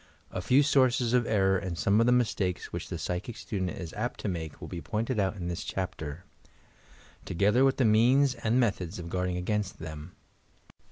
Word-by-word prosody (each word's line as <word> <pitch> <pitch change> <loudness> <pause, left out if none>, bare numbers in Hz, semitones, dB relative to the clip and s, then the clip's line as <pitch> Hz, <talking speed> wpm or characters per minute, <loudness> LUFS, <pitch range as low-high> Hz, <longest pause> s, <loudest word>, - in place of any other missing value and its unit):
A 95 - -3
few 130 +10 +4
sources 130 -4 +3
of 125 -2 +3
error 95 -3 +3
and 90 -3 -5
some 100 +4 +3
of 115 - +4
the - - +5
mistakes 105 -7 0
which - - -5
the - - -3
psychic 95 +6 -4
student 95 -4 -3
is 85 -1 -7
apt 115 +4 -3
to - - -3
make 80 -5 -4
will - - -7
be 85 - -6
pointed 110 - -2
out 95 +1 +1
in 90 -3 -5
this 85 0 -3
chapter, 80 -3 -5 0.5
— - - -26 0.2
together 105 +8 +3
with 135 -1 +3
the 130 - +3
means 125 +5 +4
and 115 0 0
methods 100 -6 0
of 85 -1 -7
guarding 90 -1 -1
against 100 +2 -2
them. 75 +2 -8
100 Hz, 200 wpm, -29 LUFS, 90-120 Hz, 0.5 s, the